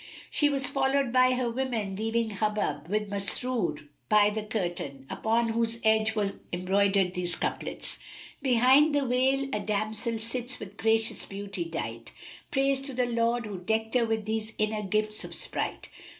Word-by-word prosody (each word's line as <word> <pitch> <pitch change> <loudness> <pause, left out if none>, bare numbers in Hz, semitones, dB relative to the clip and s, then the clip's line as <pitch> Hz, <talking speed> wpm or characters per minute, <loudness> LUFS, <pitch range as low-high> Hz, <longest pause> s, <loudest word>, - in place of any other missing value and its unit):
She 295 - +3
was 275 -1 0
followed 270 -1 +1
by 255 0 +5
her 250 -1 0
women 235 -5 -2
leaving 225 +2 0
Hubub 210 -6 -1
with 210 +1 -1
Masrur 200 -6 -1 0.2
by 210 -1 +5
the 215 +1 -2
curtain, 175 -10 -4
upon 230 +1 +1
whose 230 0 0
edge 220 0 +3
were 205 -2 -1
embroidered 190 +1 +2
these 180 -1 -2
couplets, - - -3 0.4
"Behind 265 +4 +5
the 285 -1 +2
veil 265 +2 +2
a 210 - 0
damsel 215 +3 -2
sits 240 +3 -1
with 200 0 -9
gracious 225 0 +1
beauty 200 -2 -4
dight, 115 -9 -5 0.2
* - - -18
Praise 270 0 +2
to 275 -1 -5
the 250 0 +2
Lord 235 0 +1
who 200 -3 -5
decked 220 +4 -1
her 240 -2 +3
with 220 -1 -1
these 220 0 -2
inner 215 0 0
gifts 215 +2 -1
of - - -6
sprite! - - -4
220 Hz, 165 wpm, -28 LUFS, 200-245 Hz, 0.4 s, by